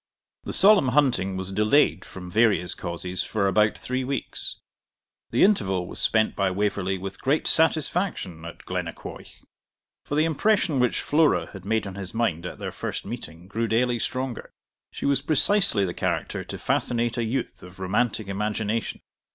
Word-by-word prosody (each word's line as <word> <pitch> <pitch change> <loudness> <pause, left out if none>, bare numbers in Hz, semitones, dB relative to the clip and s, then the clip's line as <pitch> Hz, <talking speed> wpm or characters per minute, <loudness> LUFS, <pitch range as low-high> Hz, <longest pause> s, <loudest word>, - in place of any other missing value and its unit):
The - - -3
solemn 200 -7 +6
hunting 125 -9 +2
was 95 0 -4
delayed, 105 +1 +3
from 90 -1 -9
various 105 -5 +3
causes, 90 +2 -4
for 105 -3 0
about 105 +2 +3
three 130 +1 -2
weeks. 135 +1 -3 0.7
The 120 - +3
interval 95 - +2
was - - -9
spent 110 -1 +2
by 100 -1 +1
Waverley 95 0 -1
with 95 +1 -7
great 140 +4 +1
satisfaction 160 - +1
at 85 0 -9
Glennaquoich; - - -6 0.6
for 145 - -4
the 155 +2 +3
impression 165 -2 +2
which 125 -1 +2
Flora 145 - +2
had 95 -2 -10
made 110 +1 0
on 100 - -6
his 100 +1 -6
mind 90 -8 0
at - - -8
their - - -5
first - - -5
meeting 80 +3 -8
grew 115 +3 -1
daily 120 +2 +1
stronger. 130 +1 -3 0.4
She - - -6
was 140 -1 +2
precisely 155 - +3
the 90 - -3
character - - -2
to - - -6
fascinate 120 0 0
a - - +1
youth 120 +3 -3
of 90 0 -13
romantic 105 +3 0
imagination. 105 +2 -2
110 Hz, 160 wpm, -25 LUFS, 95-135 Hz, 0.7 s, solemn